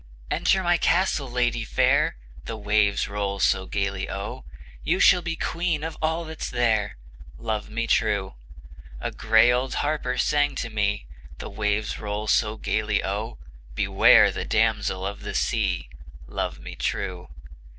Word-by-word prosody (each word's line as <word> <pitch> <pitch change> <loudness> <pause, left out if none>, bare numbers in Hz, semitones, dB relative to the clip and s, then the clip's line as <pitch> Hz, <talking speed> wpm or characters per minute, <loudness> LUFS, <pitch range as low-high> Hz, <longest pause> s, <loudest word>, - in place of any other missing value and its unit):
"Enter 190 -1 +2
my 175 0 +3
castle, 175 -7 +1
lady 120 -1 0
fair," - - +2 0.3
The 115 - -5
waves 105 -1 +1
roll 100 -1 -3
so 95 0 +2
gayly 100 -1 -2
O, 100 +1 -6 0.4
"You - - +1
shall 180 - +6
be 170 -1 -3
queen 165 -2 -1
of 160 0 -4
all 160 +1 0
that's 160 0 -5
there," 110 - 0 0.4
Love 110 -2 -3
me 115 +2 -2
true! - - +1 0.7
A - - -3
gray 110 +2 +4
old 125 +2 -1
harper 145 -4 -1
sang 145 -1 +2
to 115 - -4
me, 100 -1 -1 0.3
The - - -7
waves 105 +1 -1
roll 105 0 -3
so 110 +1 +1
gayly 105 -1 0
O, 105 +4 -3 0.4
"Beware - - +6
of - - 0
the - - -3
Damsel 105 -4 0
of 100 +1 -5
the 105 - -6
Sea!" - - 0 0.4
Love - - -4
me - - -9
true! 90 -1 -3
110 Hz, 150 wpm, -25 LUFS, 105-135 Hz, 0.7 s, shall